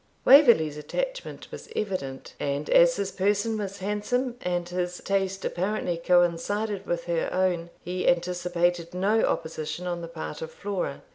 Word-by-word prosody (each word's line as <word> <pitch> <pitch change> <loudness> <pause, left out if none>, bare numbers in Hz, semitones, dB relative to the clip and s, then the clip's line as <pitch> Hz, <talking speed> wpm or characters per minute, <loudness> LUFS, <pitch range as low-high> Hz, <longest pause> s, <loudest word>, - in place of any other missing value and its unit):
Waverley's 235 - +7
attachment - - -4
was - - -9
evident; 160 -11 -4
and 140 +1 -2
as 170 0 +6
his 195 -1 -2
person 205 +3 +1
was 200 -1 -4
handsome, 210 +6 -1
and 175 -1 -1
his 180 0 -2
taste 195 -1 -1
apparently 185 -1 -1
coincided 180 +4 +1
with 170 -1 -1
her 170 -1 -1
own, 180 -2 0
he 180 +1 -2
anticipated 175 0 +1
no 205 +4 +2
opposition 160 +2 -2
on 175 -1 -3
the 170 - -6
part 160 -2 -7
of 160 - -4
Flora. 195 -8 -4
180 Hz, 145 wpm, -26 LUFS, 170-205 Hz, -, Waverley's